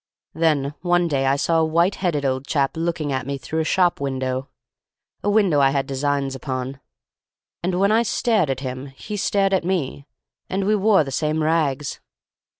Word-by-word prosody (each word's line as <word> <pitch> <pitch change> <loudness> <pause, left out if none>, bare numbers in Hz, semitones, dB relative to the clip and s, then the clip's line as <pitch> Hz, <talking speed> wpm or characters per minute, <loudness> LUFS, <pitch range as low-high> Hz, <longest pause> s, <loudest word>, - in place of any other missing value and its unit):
Then 150 -4 +1
one 175 0 +2
day 135 -4 0
I 135 - +3
saw 165 +3 +1
a - - +3
white 170 +4 +2
headed 155 -7 0
old 130 0 -1
chap 140 -2 0
looking 165 -3 -2
at 130 -1 -2
me 140 0 -2
through 135 +5 -4
a - - +2
shop 175 -1 +2
window—a 130 -1 -2 0.8
window 200 -8 +3
I 135 -1 +5
had 135 0 0
designs 140 0 -1
upon—and 135 +7 -7
when 200 +1 +3
I 225 +1 +4
stared 220 - +1
at 135 0 -2
him 130 0 -5
he 140 +10 -8
stared 195 -1 +1
at 190 - +2
me—and 175 +3 -4
we 210 +2 +3
wore 205 -3 +4
the 135 - -6
same 155 +3 0
rags. 150 -3 0
150 Hz, 170 wpm, -22 LUFS, 135-175 Hz, 0.8 s, I